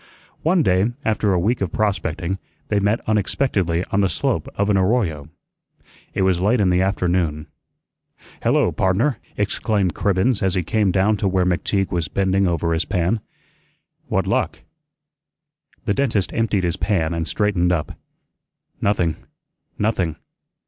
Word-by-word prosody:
One 170 Hz, +1 st, +3 dB
day, 95 Hz, +4 st, +2 dB
after 105 Hz, -2 st, +1 dB
a 95 Hz, -, +2 dB
week 110 Hz, +7 st, 0 dB
of 95 Hz, -4 st, -1 dB
prospecting, 95 Hz, -3 st, -1 dB, 0.3 s
they 105 Hz, -, +2 dB
met 105 Hz, +3 st, +1 dB
unexpectedly 100 Hz, -5 st, 0 dB
on 100 Hz, -, +2 dB
the 95 Hz, -, +2 dB
slope -, -, -1 dB
of 100 Hz, +1 st, +1 dB
an -, -, +3 dB
arroyo. 95 Hz, -, +1 dB, 0.9 s
It 95 Hz, -, +1 dB
was 95 Hz, -2 st, +2 dB
late 110 Hz, +5 st, +3 dB
in 95 Hz, -3 st, +3 dB
the 90 Hz, +1 st, +3 dB
afternoon. 90 Hz, -5 st, 0 dB, 1.0 s
"Hello, -, -, +2 dB
pardner," 100 Hz, +9 st, +1 dB, 0.2 s
exclaimed 100 Hz, -2 st, 0 dB
Cribbens 100 Hz, +4 st, +1 dB
as 95 Hz, -1 st, +1 dB
he 90 Hz, -, +1 dB
came 105 Hz, +3 st, +1 dB
down 100 Hz, +3 st, +2 dB
to 100 Hz, -, 0 dB
where 95 Hz, -1 st, +2 dB
McTeague 95 Hz, +2 st, 0 dB
was 85 Hz, -3 st, -1 dB
bending 95 Hz, +3 st, +1 dB
over 85 Hz, -1 st, 0 dB
his 80 Hz, +1 st, +1 dB
pan. 90 Hz, +5 st, 0 dB, 0.9 s
"What -, -, 0 dB
luck?" -, -, -1 dB, 1.2 s
The 105 Hz, -, +1 dB
dentist 110 Hz, -6 st, 0 dB
emptied 110 Hz, -4 st, +1 dB
his 85 Hz, 0 st, 0 dB
pan 85 Hz, -6 st, 0 dB
and 85 Hz, -1 st, -2 dB
straightened 95 Hz, -3 st, +1 dB
up. 85 Hz, -3 st, -1 dB, 0.9 s
"Nothing, 85 Hz, -6 st, +1 dB, 0.6 s
nothing. 95 Hz, -7 st, 0 dB
95 Hz, 145 wpm, -21 LUFS, 90-105 Hz, 1.2 s, One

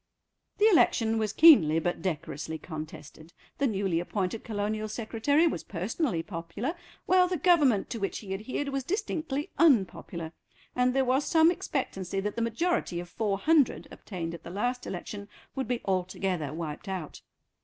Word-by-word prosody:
The 420 Hz, -, +4 dB
election 225 Hz, -, +3 dB
was 215 Hz, -2 st, 0 dB
keenly 220 Hz, -, +7 dB
but 175 Hz, +2 st, -1 dB
decorously 160 Hz, -2 st, -4 dB
contested. 155 Hz, 0 st, -9 dB, 0.3 s
The 280 Hz, -, +3 dB
newly 195 Hz, -6 st, 0 dB
appointed 190 Hz, +4 st, -3 dB
Colonial 215 Hz, 0 st, -2 dB
Secretary 230 Hz, +8 st, +1 dB
was 330 Hz, -, -1 dB
personally 190 Hz, -, -2 dB
popular, 175 Hz, -, -4 dB, 0.3 s
while 365 Hz, 0 st, +5 dB
the 360 Hz, 0 st, -1 dB
Government 290 Hz, -, +3 dB
to 230 Hz, -, -3 dB
which 195 Hz, -, -2 dB
he 195 Hz, -3 st, -6 dB
adhered 255 Hz, +8 st, -3 dB
was 275 Hz, -1 st, -2 dB
distinctly 315 Hz, -, -3 dB
unpopular, 190 Hz, -, +2 dB, 0.4 s
and 250 Hz, +1 st, +2 dB
there 270 Hz, -1 st, +3 dB
was 260 Hz, +3 st, +2 dB
some 325 Hz, +1 st, +5 dB
expectancy 195 Hz, -, -3 dB
that 205 Hz, +2 st, -3 dB
the 230 Hz, -, -2 dB
majority 230 Hz, -, 0 dB
of 175 Hz, 0 st, -7 dB
four 205 Hz, 0 st, -1 dB
hundred, 305 Hz, +3 st, +2 dB
obtained 170 Hz, -4 st, -6 dB
at 170 Hz, -, -8 dB
the -, -, -9 dB
last 245 Hz, +7 st, -2 dB
election, 200 Hz, +3 st, -6 dB, 0.2 s
would 265 Hz, -3 st, -3 dB
be 245 Hz, -1 st, -1 dB
altogether 185 Hz, -4 st, -1 dB
wiped 160 Hz, +3 st, -6 dB
out. 185 Hz, -6 st, -5 dB
215 Hz, 155 wpm, -28 LUFS, 175-270 Hz, 0.4 s, keenly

